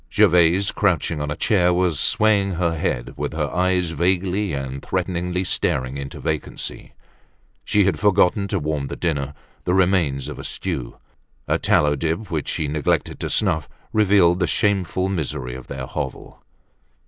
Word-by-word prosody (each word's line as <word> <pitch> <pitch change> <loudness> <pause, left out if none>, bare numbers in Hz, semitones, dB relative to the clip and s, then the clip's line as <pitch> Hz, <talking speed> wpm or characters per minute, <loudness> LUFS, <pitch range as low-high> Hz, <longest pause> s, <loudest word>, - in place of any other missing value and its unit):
Gervaise, 90 +3 +4
crouching 85 -5 0
on 75 - -2
a 75 - -2
chair 90 0 +2
was 90 -4 +1
swaying 100 0 +2
her 85 -1 0
head, - - -2
with - - -3
her 75 -2 -2
eyes 90 -2 +1
vaguely 95 +3 0
and 70 -1 -4
threateningly 90 0 -1
staring 65 -7 -1
into 70 -1 -7
vacancy. 75 -1 -4 0.7
She 105 -2 +3
had 90 -6 +1
forgotten 100 0 +3
to - - -1
warm 75 -2 -2
the - - -5
dinner, 70 -4 -2 0.3
the 90 - +1
remains 90 -8 +2
of - - -7
a - - -6
stew. 60 - -4 0.5
A - - +1
tallow 75 0 +3
dip 80 +8 -2
which 80 -4 -2
she 75 - -1
neglected 75 -1 -1
to - - -3
snuff 80 -8 0 0.2
revealed 95 -5 +4
the 90 - +1
shameful 95 -2 +1
misery 75 -8 -3
of 65 0 -9
their 65 -2 -5
hovel. - - -6
85 Hz, 160 wpm, -22 LUFS, 75-95 Hz, 0.7 s, Gervaise